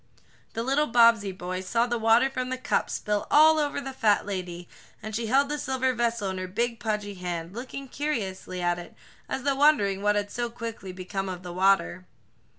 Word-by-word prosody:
The 230 - -2
little 275 +4 +1
Bobbsey 230 -4 +5
boy 185 0 -5
saw 230 +6 +1
the 240 -1 -2
water 225 +3 +4
from 255 -1 -4
the 260 - -2
cup 255 - 0
spill 210 -1 -2
all 315 +1 +6
over 290 -1 -1
the 270 -1 -6
fat 215 -5 +2
lady, 180 -3 -5 0.3
and 215 0 -6
she 230 0 -2
held 275 +4 +3
the 295 +1 -3
silver 260 -1 0
vessel 230 -4 -1
in 190 - -5
her 185 - -4
big, 230 +4 -2
pudgy 210 -2 -2
hand, 175 -2 -5
looking 265 +4 -7
curiously 195 -11 -3
at 175 0 +1
it, 175 - -11 0.3
as 265 - -3
though 280 0 +2
wondering 205 -10 +3
what 210 0 +2
had 205 0 -1
so 240 0 -2
quickly 230 -5 -7
become 190 +1 -4
of 180 -1 -6
the 175 -1 -7
water. 175 - +2
220 Hz, 200 wpm, -27 LUFS, 185-255 Hz, 0.3 s, all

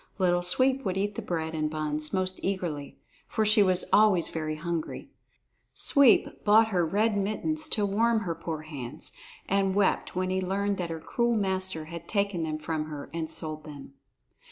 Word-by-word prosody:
Little 175 -2 +2
Sweep 260 +9 +2
would 190 -2 -2
eat 205 +2 -1
the - - -5
bread 160 -2 -3
and 155 -1 -1
buns 155 0 -2
most 185 0 -1
eagerly, 175 -7 -3 0.3
for 220 - 0
she 215 0 +5
was 185 -2 +4
always 205 -5 +5
very 155 -1 -3
hungry. 165 0 -4 0.6
Sweep 280 -4 +4
bought 220 +2 +5
her 180 -4 +1
red 205 +6 +1
mittens 260 +11 -1
to 215 -8 0
warm 225 +3 +2
her 175 -5 -2
poor 160 -1 -5
hands, 150 -1 -8 0.4
and 195 -1 +1
wept 200 -2 +1
when 185 0 -1
he 190 0 0
learned 200 +2 -1
that 175 -2 -3
her 165 -1 -4
cruel 235 +8 0
master 190 -5 -1
had 170 +1 -9
taken 200 -4 0
them 155 -1 -2
from 155 0 -3
her 150 -2 -8
and 165 -1 -3
sold 155 -1 -4
them. 145 -3 -10
185 Hz, 180 wpm, -28 LUFS, 160-205 Hz, 0.6 s, she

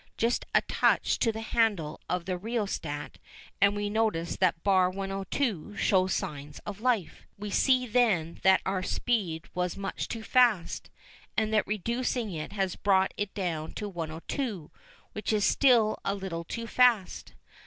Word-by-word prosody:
Just 230 +2 0
a - - +6
touch - - +2
to 230 - +2
the 220 0 -6
handle 215 -9 0
of 180 -1 -1
the 185 - -1
rheostat 190 -8 -4 0.4
and 200 +1 +5
we 205 0 -1
notice 210 -6 0
that 180 -3 +1
bar 190 -2 +4
102 195 - -3
shows 185 -2 +2
signs 150 -5 -5
of 205 0 -6
life. 235 -8 0 0.2
We 205 0 -6
see 255 +4 +3
then 215 -9 +1
that 190 0 +5
our 190 -1 0
first 185 - -2
speed 190 -9 -1
was 180 -1 -2
much 195 -1 -4
too 225 -1 -5
fast, 225 -9 +2 0.5
and 220 0 +1
that 215 - +2
reducing 235 +2 -1
it 155 -2 -5
has 195 -3 -1
brought 190 -1 +2
it 205 -1 -3
down 165 -6 -3
to 210 - -4
102, 170 - -4 0.4
which 210 0 -3
is 210 -2 +2
still 235 -6 +4
a 195 - 0
little 180 -4 -5
too 230 +6 -5
fast. 235 -5 +2
200 Hz, 160 wpm, -29 LUFS, 180-225 Hz, 0.5 s, a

